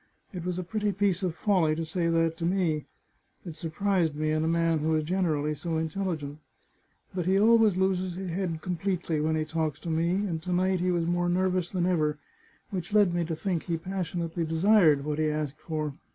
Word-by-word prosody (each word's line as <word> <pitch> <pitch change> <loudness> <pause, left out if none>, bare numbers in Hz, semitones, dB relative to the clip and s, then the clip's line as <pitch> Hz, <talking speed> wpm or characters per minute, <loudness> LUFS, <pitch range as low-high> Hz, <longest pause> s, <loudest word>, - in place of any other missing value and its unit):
It 180 -2 -5
was 180 0 -2
a 185 - -2
pretty 210 +3 -1
piece 200 -2 +1
of 180 -4 -1
folly 175 -8 +2
to 165 +1 -3
say 170 +2 -1
that 165 -1 +2
to 165 - -6
me. 170 -5 0 0.6
It 170 -3 -7
surprised 165 0 0
me 155 +1 0
in 155 0 +1
a - - 0
man 165 -1 +2
who 160 +1 +1
is 155 - +1
generally 155 -4 0
so 160 +2 -3
intelligent. 160 -3 -3 0.7
But 180 -2 -2
he 190 +1 +4
always 220 -2 +5
loses 185 -1 0
his 185 -1 -4
head 170 -3 -2
completely 180 -3 -1
when 160 +1 +1
he 155 0 0
talks 155 -1 -2
to 170 - -4
me, 165 +1 +1 0.2
and 165 -5 -3
to 180 +2 -5
night 185 +1 +2
he 180 +1 0
was 175 -2 +1
more 175 +1 +1
nervous 180 -1 +1
than 180 -2 -1
ever, 155 -4 +1 0.5
which 185 -1 -4
led 205 -4 +4
me 175 0 +1
to 165 0 -3
think 180 -1 -2
he 170 -1 -1
passionately 170 -1 -3
desired 160 -3 +4
what 150 0 -2
he 155 0 +2
asked 150 -1 -3
for. 155 -3 -3
170 Hz, 210 wpm, -28 LUFS, 160-185 Hz, 0.7 s, always